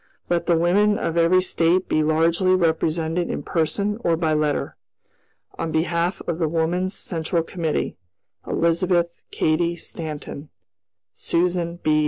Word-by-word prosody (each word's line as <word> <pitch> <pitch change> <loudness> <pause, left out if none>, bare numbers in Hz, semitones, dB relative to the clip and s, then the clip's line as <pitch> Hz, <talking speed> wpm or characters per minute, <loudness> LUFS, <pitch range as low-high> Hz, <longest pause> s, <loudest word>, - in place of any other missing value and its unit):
"Let 170 0 +1
the 170 - +4
women 205 +5 +3
of 165 - -2
every 170 +2 +4
State 180 +1 +2
be 155 - +2
largely 165 +4 +3
represented 165 0 0
in - - -3
person 200 +6 -1
or 165 -1 +2
by 160 -2 +1
letter. 150 -1 0 0.8
"On 165 - -2
behalf 170 +2 0
of 170 -1 -2
the 160 -3 +1
Woman's 175 +4 0
Central 165 -6 -2
Committee, 165 -2 -2 0.5
"Elizabeth 170 +1 +1
Cady 170 +2 +1
Stanton, 150 -3 -7 0.6
"Susan 170 0 0
B. 155 - +2
170 Hz, 130 wpm, -23 LUFS, 160-180 Hz, 0.8 s, the